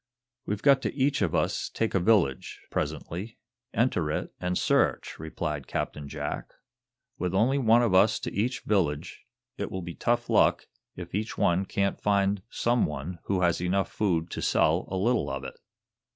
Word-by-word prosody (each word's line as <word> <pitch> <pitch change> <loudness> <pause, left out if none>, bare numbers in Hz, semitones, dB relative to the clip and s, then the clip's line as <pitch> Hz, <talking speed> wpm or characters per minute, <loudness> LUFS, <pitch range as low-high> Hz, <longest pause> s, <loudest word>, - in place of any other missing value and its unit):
"We've 105 0 -3
got 140 -2 +5
to - - -2
each 140 -1 +1
of 95 -5 +1
us - - 0
take 115 - -2
a 95 - +3
village, 90 - +2
presently, 95 +7 -4 0.3
enter 100 -10 +1
it - - -3
and 90 0 -1
search," - - +1
replied 75 -2 -4
Captain 75 -1 -3
Jack. - - -5 0.6
"With 90 +1 -1
only 125 +8 +3
one 120 -1 +5
of 115 -5 +1
us 100 +3 +5
to - - -4
each 120 +5 -1
village, 80 -9 -1 0.3
it - - -2
will 95 -1 -5
be 85 0 -6
tough 120 +4 0
luck - - +3 0.3
if 90 -1 -8
each 105 +4 -3
one 90 +3 +2
can't 100 -1 -1
find 100 -1 +2
some 120 0 +1
one 75 +4 -6
who 95 -2 0
has 85 -1 +2
enough 95 +2 0
food 85 -5 0
to - - -4
sell 80 +3 +2
a 95 - -2
little 115 +6 +1
of 70 0 -4
it." 65 - -8
95 Hz, 175 wpm, -27 LUFS, 85-110 Hz, 0.6 s, got